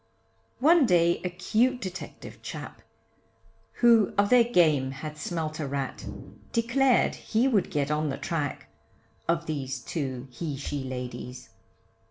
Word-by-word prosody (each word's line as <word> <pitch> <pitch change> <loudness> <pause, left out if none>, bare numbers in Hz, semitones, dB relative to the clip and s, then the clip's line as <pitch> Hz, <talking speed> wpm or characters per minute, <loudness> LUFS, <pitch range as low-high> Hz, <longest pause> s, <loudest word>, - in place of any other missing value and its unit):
One 310 +1 +5
day 170 -2 +3
a 180 - -1
cute 220 +8 +1
detective 185 -4 -8
chap, - - -7 1.0
Who 230 -3 +6
of 200 +2 +3
their 250 -1 +8
game 160 - +3
had 150 +3 -6
smelt 155 0 -3
a 150 - -2
rat, 135 -1 -4 0.4
Declared 250 +2 +3
he 235 +4 0
would 220 -8 +2
get 145 -1 -1
on 150 0 0
the 135 - -3
track, 150 -4 -3 0.6
Of 170 0 +1
these 135 -4 -3
two 130 -1 -4
he 145 +2 -4
she 140 0 -4
ladies. 125 -1 -6
165 Hz, 135 wpm, -27 LUFS, 140-220 Hz, 1.0 s, their